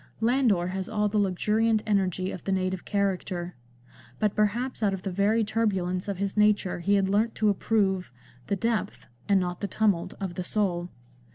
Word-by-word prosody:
Landor 225 -7 +2
has 190 0 -4
all 210 -1 +1
the 210 +1 +1
luxuriant 215 +3 +1
energy 190 -3 0
of 180 - -7
the 195 - -2
native 185 -1 -1
character. 185 -3 -2 0.6
But 210 -2 +1
perhaps 225 +5 0
out 200 -2 +2
of 185 - -10
the 195 - -3
very 205 +5 +2
turbulence 190 -5 -1
of 200 -2 -3
his 200 0 -2
nature 210 -4 +2
he 200 +4 +2
had 195 -1 +2
learnt 215 +4 +1
to 215 - +2
approve 195 - 0 0.4
"The 200 - +1
depth, 220 0 -2 0.2
and 200 -1 +5
not 180 -1 -3
the 200 - -1
tumult, 200 -5 0
of 190 -3 -4
the 180 - -4
soul." 180 -3 -1
200 Hz, 180 wpm, -27 LUFS, 185-215 Hz, 0.6 s, and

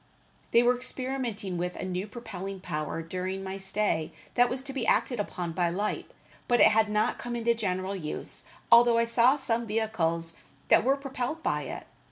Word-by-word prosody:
They 235 - +5
were 245 +1 +4
experimenting 245 -7 -3
with 180 +1 -2
a - - -5
new 185 +2 -3
propelling 195 -4 -7
power 155 -2 -4
during 185 +3 -4
my 190 +1 -5
stay 190 -4 0 0.2
that 245 0 +4
was 255 +1 -3
to 275 0 -6
be 260 -4 -2
acted 245 -4 +2
upon 180 -4 -3
by 175 +1 +1
light, 205 +5 -2 0.4
but 240 -2 +3
it - - +8
had 220 0 +3
not 210 0 +1
come 240 0 -4
into 235 0 +2
general 190 -3 -2
use, 155 -5 -6 0.3
although 235 0 +7
I 230 - +3
saw 235 +3 +5
some 235 -4 0
vehicles 170 -7 -1 0.3
that - - +6
were 270 +2 +3
propelled 275 +3 -4
by 150 -1 0
it. - - -6
215 Hz, 185 wpm, -28 LUFS, 185-240 Hz, 0.4 s, it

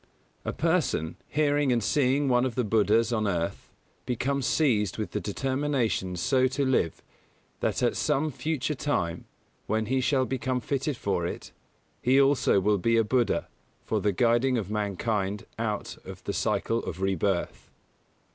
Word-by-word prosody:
A - - -2
person, 80 +1 0
hearing 145 -2 +2
and 120 -3 +1
seeing 140 +2 +2
one 125 -1 +3
of 130 -3 -2
the 125 - +1
Buddhas 110 +2 +2
on 110 -2 +1
earth, 85 -4 -2 0.4
becomes 130 +2 -1
seized 110 - +2
with 110 - -3
the 105 - -1
determination 130 -3 -1
so 130 +8 +2
to 135 +2 -1
live 125 -11 0 0.6
that - - -1
at - - +2
some 155 +3 +1
future 150 +2 -2
time, 85 - -2 0.4
when 110 +1 0
he 130 +4 +1
shall 130 0 +2
become 130 0 -1
fitted 135 +2 -2
for 90 -6 -1
it, - - -7 0.5
he 130 +3 +4
also 135 -7 +4
will 105 +1 +2
be 115 +5 +2
a 115 - +4
Buddha 115 -4 +1 0.4
for - - 0
the 105 - +2
guiding 120 +5 +2
of 105 -3 -3
mankind 105 -1 -1
out 105 -3 -3
of - - -10
the - - -3
cycle 115 - 0
of 90 - -5
rebirth. 95 -1 -1
120 Hz, 155 wpm, -27 LUFS, 105-135 Hz, 0.6 s, he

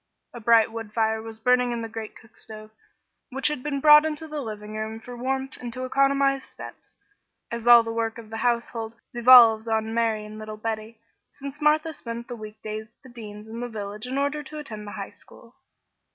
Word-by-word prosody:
A 240 - -7
bright 225 0 +4
wood 225 -2 -7
fire 220 -1 +1
was 225 0 -8
burning 250 +1 +3
in 235 -1 -3
the - - -4
great 225 -1 -7
cookstove, 215 -1 -11 0.6
which 270 +3 0
had 300 -4 -3
been 280 0 -2
brought 300 +1 +8
into 315 0 -3
the 300 -1 -4
living 215 -3 -7
room 220 +1 -4
for 245 +2 -10
warmth 265 +2 -3
and 245 -1 -6
to 255 +1 -4
economize 275 0 +2
steps, - - -12 0.6
as 235 0 -5
all 240 -1 +9
the 225 0 -4
work 225 0 -2
of 225 -2 -11
the 225 - -4
household 235 -1 -1 0.2
devolved 235 -2 +7
on 220 0 0
Mary 225 -2 0
and 215 0 -9
little 215 0 -7
Betty, 220 0 -4 0.3
since 280 +2 -9
Martha 310 +2 +3
spent 235 -3 -7
the 245 - -6
week 215 -1 -10
days 215 0 -5
at 235 - -38
the 260 - -13
Deans 215 -3 -10
in 225 +1 -7
the 245 0 -4
village 210 0 -6
in 260 +2 -3
order 285 +2 0
to 300 +2 -10
attend 215 -8 -7
the 205 - -7
high - - -6
school. - - -17
230 Hz, 210 wpm, -25 LUFS, 220-260 Hz, 0.6 s, all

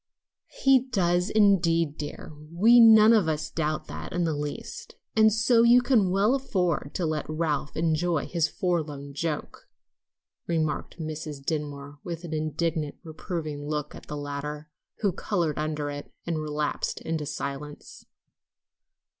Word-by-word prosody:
"He 270 -1 +7
does, 185 -7 0
indeed, 170 -7 +3
dear; 150 +1 -7 0.2
we 225 +8 +6
none 220 -1 +8
of 210 -7 +3
us 155 -1 -2
doubt 155 -1 -2
that - - -7
in 175 - 0
the 165 -2 0
least; 145 0 -6 0.2
and 220 0 +6
so 230 +2 +3
you 240 +1 +6
can 230 -7 +3
well 200 +6 +3
afford 185 - -1
to 180 - -1
let 155 -1 -2
Ralph 155 -2 -2
enjoy 160 0 +1
his 170 -2 0
forlorn 150 -7 -3
joke," 150 +1 -4 0.8
remarked 160 -2 -2
Mrs. 155 -3 -6
Dinsmore, 145 -2 -4
with 170 -1 -6
an 165 -2 -6
indignant, 155 0 -2
reproving 155 -3 -5
look 150 -1 -3
at - - -12
the 150 - -5
latter, 145 +1 -5 0.3
who 205 -3 +2
colored 170 -5 -1
under 150 -1 -2
it, 145 0 -8
and 165 -2 -2
relapsed 150 0 -2
into 160 -2 -3
silence. 145 +1 -7
160 Hz, 140 wpm, -27 LUFS, 150-180 Hz, 0.8 s, none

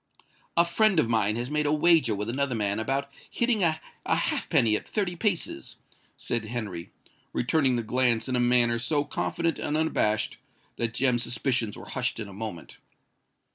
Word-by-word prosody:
"A 170 - +6
friend 195 +1 +3
of 135 - +2
mine 110 -2 +2
has 120 +4 -4
made 150 0 +1
a - - +2
wager 155 -7 +4
with 105 +1 -3
another 130 +1 -1
man 100 -1 -1
about 135 +4 -2 0.2
hitting 235 -3 +1
a 160 -2 +2 0.3
halfpenny 110 -2 +2
at - - -4
thirty 195 -5 -1
paces," 175 - -1 0.4
said 120 -2 -3
Henry, 105 -7 -5 0.4
returning 135 0 +2
the 120 - -1
glance 120 0 +2
in 130 - -1
a - - +2
manner 120 -1 +4
so 145 +5 0
confident 165 +2 -2
and 150 +1 -1
unabashed, 110 -9 0 0.4
that 115 -1 -1
Jem's 125 -1 +3
suspicions 115 -3 -1
were - - -10
hushed 125 -3 -2
in 110 - -4
a 100 - -11
moment. 100 -4 -7
125 Hz, 170 wpm, -27 LUFS, 110-150 Hz, 0.4 s, A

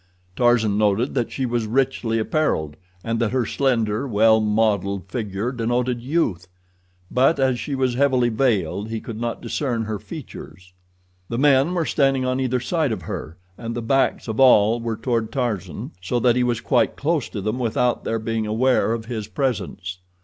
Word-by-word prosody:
Tarzan 115 -4 +3
noted 110 +5 +1
that 125 -4 -1
she 135 - -2
was 120 -2 -1
richly 120 -1 0
appareled, 110 - 0 0.3
and 115 0 -1
that 115 - +1
her 125 0 0
slender, 115 -2 0
well 110 -1 +4
modeled 105 -3 +1
figure 105 0 -3
denoted 120 0 -1
youth; 120 - -1 0.6
but 135 +4 +3
as 130 -2 +2
she 145 - -3
was 130 -2 +1
heavily 130 -2 +2
veiled 110 -5 0
he 115 0 -3
could 115 0 -7
not 120 -1 -3
discern 120 -6 -1
her 110 -2 -4
features. 90 0 -10 0.6
The 115 - -2
men 140 +5 +3
were 170 -2 0
standing 135 -3 +2
on 130 +1 0
either 130 -1 0
side 155 +1 0
of 100 -6 -4
her, 80 +1 -6 0.2
and 115 0 -5
the 120 - -3
backs 135 +2 +1
of 110 -1 -3
all 115 -3 +5
were 115 -1 -3
toward 115 -1 -1
Tarzan, 120 -8 -3
so 120 +6 -1
that 120 0 +3
he 125 - +2
was 120 -2 0
quite - - +2
close 155 -2 -1
to 105 - -5
them 110 +5 -2
without 120 +1 0
their 115 - -1
being 110 0 -2
aware 115 +1 +2
of 115 -1 -4
his 110 -3 -5
presence. 95 - -3
115 Hz, 180 wpm, -22 LUFS, 110-130 Hz, 0.6 s, all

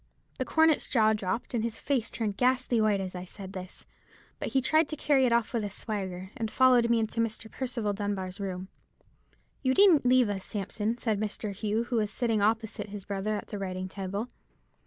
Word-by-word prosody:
"The 260 - 0
cornet's 320 +2 +3
jaw 220 -3 +4
dropped, 210 +3 -3
and 230 -2 0
his 230 -1 -2
face 260 -6 0
turned 215 -4 -2
ghastly 250 -1 +2
white 210 -2 +3
as 185 -1 -4
I 180 0 -5
said 190 +1 -9
this; 185 -1 -8 0.5
but - - -2
he 270 - +2
tried 310 +5 +3
to 305 - -3
carry 275 -3 +3
it - - 0
off 235 0 +2
with 230 -3 0
a 205 - -2
swagger, 190 -3 -5
and 225 -1 -2
followed 250 -1 +5
me 235 - +4
into 225 +1 -1
Mr. 220 0 -3
Percival 240 -5 -2
Dunbar's 200 -2 -3
room. 190 -1 -4 0.9
"'You 260 -1 +2
needn't 380 -7 +6
leave 250 -1 +5
us, 195 -2 -3
Sampson,' 210 +3 -3
said 220 -4 -1
Mr. 210 -1 -3
Hugh, 215 +3 -1
who 235 0 -2
was 210 -2 +1
sitting 225 0 0
opposite 220 0 0
his 200 -1 -7
brother 200 +2 -2
at - - -6
the 205 - -5
writing 185 -1 -3
table. 195 +4 -4
215 Hz, 200 wpm, -29 LUFS, 200-240 Hz, 0.9 s, needn't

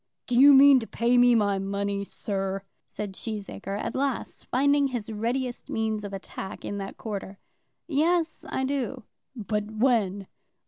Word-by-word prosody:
"Do 245 - -2
you 275 +4 +8
mean 275 0 +8
to 225 - -7
pay 235 +2 +1
me 245 0 +6
my 200 -3 +2
money, 200 +1 -2
sir?" 195 -1 -3 0.2
said 205 -2 -6
Cheesacre, 200 -2 -5
at - - -3
last, 275 -1 -3
finding 285 +2 +3
his 235 -4 -4
readiest 240 +3 -3
means 220 -1 -1
of 205 - -6
attack 195 0 -7
in 200 - -4
that 195 0 -6
quarter. 200 -2 -6 0.5
"Yes, 330 +2 +1
I 265 - -1
do." 265 -2 -2 0.3
"But 210 -2 -3
when?" 215 -4 +1
220 Hz, 150 wpm, -26 LUFS, 200-265 Hz, 0.5 s, you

